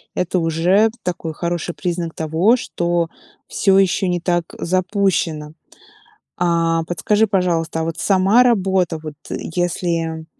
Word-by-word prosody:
это 180 0 0
уже 175 +7 +3
такой 170 -3 -4
хороший 170 +1 -3
признак 175 -2 -3
того, 165 +9 +2
что 175 -6 -1 0.4
всё 195 -2 +2
еще 190 -1 +2
не 175 - 0
так 175 -1 +1 0.2
запущено. 180 -4 0 0.8
А, 165 -1 +1
подскажи, 210 +6 +1
пожалуйста, 170 -4 0
а - - -1
вот 165 0 -4
сама 195 +7 +4
работа 190 -7 +1
вот, 155 -1 -7 0.2
э, - - -2 0.2
если, 165 -2 -1
175 Hz, 125 wpm, -19 LUFS, 165-190 Hz, 0.8 s, сама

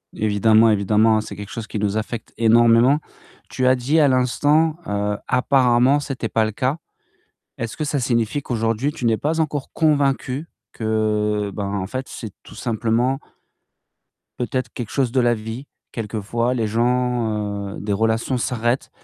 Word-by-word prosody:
Évidemment, 110 +2 +4
évidemment, 110 +1 +3
c'est - - -8
quelque 105 0 -8
chose 115 -2 -6
qui 105 - -4
nous 105 +1 0
affecte 110 +1 -5
énormément. 115 +4 +5 0.5
Tu 130 - -1
as 130 - +5
dit 140 +6 +1
à 145 - +5
l'instant, 145 +5 +2
heu, 105 0 -1
apparemment, 125 +1 +3
c'était 135 -5 -4
pas 110 -1 +2
le 110 - -2
cas. 130 +8 -1 0.8
Est-ce 115 -1 -5
que 155 - -2
ça 145 -1 -1
signifie 120 +2 0
qu'aujourd'hui, 115 +3 -1
tu 130 -6 -5
n'es 110 -1 +3
pas 160 +3 -1
encore 150 -3 -2
convaincu 145 -1 +1 0.3
que, 105 -2 0
ben, 100 -2 -3
en 95 -2 -2
fait, 130 +3 -4
c'est 110 -5 -8
tout - - -14
simplement 120 +3 0 1.2
peut-être 125 0 -3
quelque 120 -4 -5
chose 130 -4 0
de 130 -1 +2
la 120 0 +3
vie. 115 +5 -7 0.2
Quelquefois, 115 +2 -2
les 115 -2 0
gens, 115 -4 0
heu - - -8
des 100 0 -2
relations 115 +4 0
s'arrêtent 120 +1 -1
115 Hz, 160 wpm, -21 LUFS, 110-130 Hz, 1.2 s, énormément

